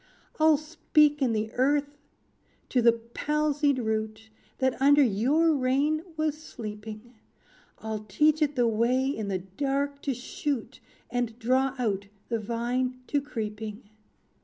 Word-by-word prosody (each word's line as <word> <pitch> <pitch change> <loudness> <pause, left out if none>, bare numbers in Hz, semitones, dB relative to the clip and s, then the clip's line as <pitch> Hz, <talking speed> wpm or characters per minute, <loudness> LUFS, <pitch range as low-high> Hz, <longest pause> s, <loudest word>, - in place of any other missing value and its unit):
"I'll 310 -1 +6
speak 305 -1 +2
in 255 -3 +3
the 220 0 -1
earth 285 +2 +1 0.7
to 250 - +2
the 235 0 +7
palsied 285 +5 0
root, 220 -1 -3 0.3
That 260 0 0
under 285 +1 +6
your 270 +9 +3
reign 280 +3 +1 0.2
was 310 -1 0
sleeping; 215 -3 -8 0.6
I'll 220 -1 -5
teach 300 +10 +2
it 295 -1 +2
the 245 -2 +3
way 235 +4 +2
in 220 -7 -2
the 195 -1 0
dark 275 +9 -2
to 275 -3 -1
shoot, 260 +1 -4 0.3
And 240 -2 -2
draw 260 +3 +1
out 200 -5 -1 0.2
the 230 -1 0
vine 245 +3 -2
to 285 - +1
creeping. 215 -4 -6
255 Hz, 135 wpm, -27 LUFS, 220-285 Hz, 0.7 s, the